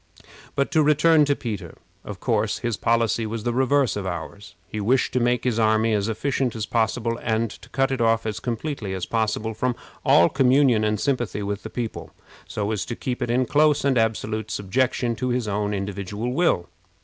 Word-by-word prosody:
But 140 - 0
to 160 - +4
return 150 +1 +5
to 145 0 +1
Peter. 110 -8 -6 0.3
Of - - -8
course, - - 0
his 120 -2 -2
policy 115 0 +1
was 110 0 -4
the 120 0 -1
reverse 130 +1 +2
of 100 -2 -3
ours. 90 +2 -7
He 105 - -4
wished 125 +5 +1
to 125 - +2
make 120 0 +1
his 120 -3 0
army 110 0 +3
as 105 +1 0
efficient 130 +2 -1
as 110 -2 -2
possible, 115 +1 0
and 110 -1 0
to - - -13
cut 135 0 +1
it 130 - -1
off 115 -1 +2
as 110 0 -3
completely 115 -4 -3
as 95 - -3
possible 110 0 -1
from 125 +2 -1 0.3
all 85 - +6
communion 130 -3 +3
and 105 -1 0
sympathy 120 -6 -1
with 100 0 -3
the - - -7
people, 120 -3 -5 0.4
so 105 0 -2
as 105 - -1
to 120 - -4
keep 125 +1 -4
it 120 - -1
in 125 +2 +2
close 150 +2 +3
and 140 -2 +3
absolute 110 -1 -1
subjection 120 +4 0
to 125 +3 -2
his 120 -2 -1
own 105 0 -1
individual 100 +3 -3
will. 140 - +1
115 Hz, 195 wpm, -24 LUFS, 105-130 Hz, 0.4 s, all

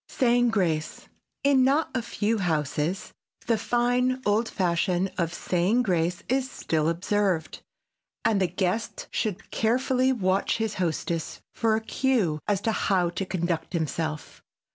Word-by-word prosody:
[Sidenote: - - -14
SAYING 245 -1 +4
GRACE] 165 -8 -1 0.4
In 275 -2 +5
not 280 +5 +2
a 255 - 0
few 225 -1 -1
houses 160 +1 -1 0.3
the 230 - +2
fine 245 +3 +1
old 215 +3 +2
fashion 180 +1 0
of 170 -1 0
saying 185 +7 +1
grace 175 -3 0
is 260 +1 0
still 160 - 0
observed 180 -1 0 0.6
and 215 -3 +3
the 185 - +3
guest 185 +5 -2
should 200 -3 -3
carefully 255 +3 +2
watch 195 -5 +1
his 220 -2 -1
hostess 165 -1 -2
for 225 -1 +2
a 220 - -1
cue 220 - 0
as 205 -2 +1
to 225 - +1
how 185 -5 +1
to 190 +2 -3
conduct 170 -3 -2
himself. 160 -2 -3
195 Hz, 140 wpm, -26 LUFS, 170-235 Hz, 0.6 s, In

